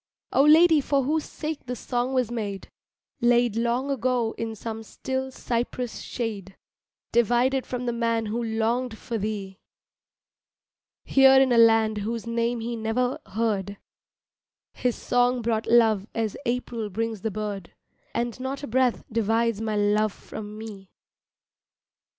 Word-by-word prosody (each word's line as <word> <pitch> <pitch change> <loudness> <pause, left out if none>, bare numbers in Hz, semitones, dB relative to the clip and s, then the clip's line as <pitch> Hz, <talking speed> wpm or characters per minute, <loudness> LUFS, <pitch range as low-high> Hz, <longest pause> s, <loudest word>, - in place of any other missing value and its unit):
Oh - - +5
lady 320 0 +7
for 275 0 +1
whose 305 +3 0
sake 310 -4 -6
the 250 - -3
song 245 +1 -2
was 250 -3 0
made, 205 -5 -4 0.5
Laid 240 -2 +3
long 240 +4 0
ago 250 -3 0
in 225 -1 -4
some 225 +1 -6
still 260 +4 -4
cypress 245 -1 -3
shade, 205 -5 -5 0.5
Divided 245 +3 +2
from 250 0 -4
the 240 - -1
man 230 -1 0
who 220 +3 -2
longed 225 +1 -1
for 230 0 -4
thee, 200 -2 -4 1.4
Here 270 0 +6
in 265 -1 +4
a 240 - +4
land 225 -2 +5
whose 225 +3 -3
name 235 0 -1
he 235 +1 -3
never 230 +3 -1
heard, 200 -1 -1 1.0
His 250 -2 -1
song 245 0 +1
brought 220 -1 0
love 220 -4 +4
as 220 -2 -1
April 240 -3 -2
brings 220 +1 -3
the 220 - -1
bird, 205 -3 -5 0.4
And 235 +1 -2
not 265 +2 -4
a - - -4
breath 250 +1 +1
divides 225 0 +1
my 220 -1 -1
love 210 +1 +2
from 210 0 -9
me! 205 -4 -9
230 Hz, 140 wpm, -25 LUFS, 220-250 Hz, 1.4 s, lady